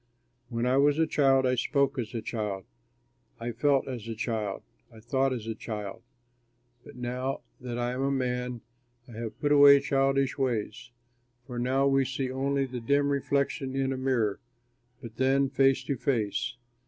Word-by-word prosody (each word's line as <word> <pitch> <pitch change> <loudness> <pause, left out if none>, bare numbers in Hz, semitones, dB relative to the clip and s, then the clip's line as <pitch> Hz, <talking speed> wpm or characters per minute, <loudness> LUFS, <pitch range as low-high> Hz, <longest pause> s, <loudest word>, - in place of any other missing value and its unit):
When 115 -1 -1
I 125 +1 +3
was 145 +1 +4
a 160 - +3
child, 135 -3 +3
I 125 - +2
spoke 140 +2 +1
as 120 +1 -4
a 115 - -3
child, 105 -5 -3 0.7
I 120 +1 -3
felt 135 +4 +2
as 120 -4 -6
a 115 - -4
child, 110 -3 -3 0.3
I 110 - -14
thought 130 +4 0
as 120 -4 -4
a 115 - -3
child; 105 -3 -6 0.8
but - - -13
now 125 +2 -3 0.2
that 125 -2 -5
I 120 0 -1
am 130 +1 -3
a 135 - +1
man 125 -2 -2 0.5
I - - -13
have 115 -1 -6
put 145 - 0
away 140 -1 +8
childish 135 0 +1
ways. 120 -2 -2 0.6
For 125 -2 -5
now 130 +3 +1
we 135 0 +3
see 130 0 -3
only 135 +1 0
the 125 -1 -6
dim 140 +4 +2
reflection 140 -1 -1
in 135 0 0
a - - -4
mirror, 125 -6 0 0.6
but 115 -1 -9
then 135 +1 +2
face 135 0 +3
to 140 - -2
face. 115 -6 -1
130 Hz, 175 wpm, -28 LUFS, 120-135 Hz, 0.8 s, away